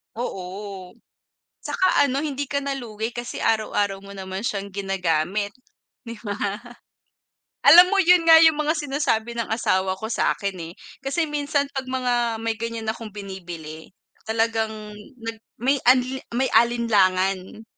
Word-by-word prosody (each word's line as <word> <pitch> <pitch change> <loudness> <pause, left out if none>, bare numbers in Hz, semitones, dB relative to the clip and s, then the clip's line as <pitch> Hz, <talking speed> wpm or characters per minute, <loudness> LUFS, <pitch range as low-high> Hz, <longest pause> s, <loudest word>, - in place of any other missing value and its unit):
Oo, 195 -3 -6 0.7
tsaka 370 - +2
ano 275 0 0
hindi 285 -2 -2
ka 280 - 0
na 280 -1 -3
lugi 225 -2 -5
kasi 240 0 -5
araw-araw 205 -3 0
mo 200 - -11
naman 190 +1 -6
siyang 200 -4 -2
ginagamit, 195 0 -1 0.5
'di 230 -1 -7
ba? 205 - -2 1.3
Alam 360 +3 +9
mo 400 - +3
yun 360 -1 +5
nga 325 0 +10
yung 320 -2 +6
mga 305 +2 +1
sinasabi 270 -6 -1
ng 230 - -2
asawa 190 -4 +1
ko 220 +3 -6
sa'kin, 200 -2 0 0.2
eh. - - -13 0.3
Kasi 305 +4 0
minsan 290 -1 -1
'pag 265 -1 -4
mga 255 -1 0 0.3
may 225 0 -2
ganyan 230 0 -5
akong 220 -1 -4
binibili 175 -6 -8 0.3
talagang 225 0 0 0.5
nag 225 0 -5 0.2
may 265 +4 +2
anli 255 +1 +3
may 260 +3 +1
alinlangan. 195 -4 +2
225 Hz, 140 wpm, -23 LUFS, 195-265 Hz, 1.3 s, nga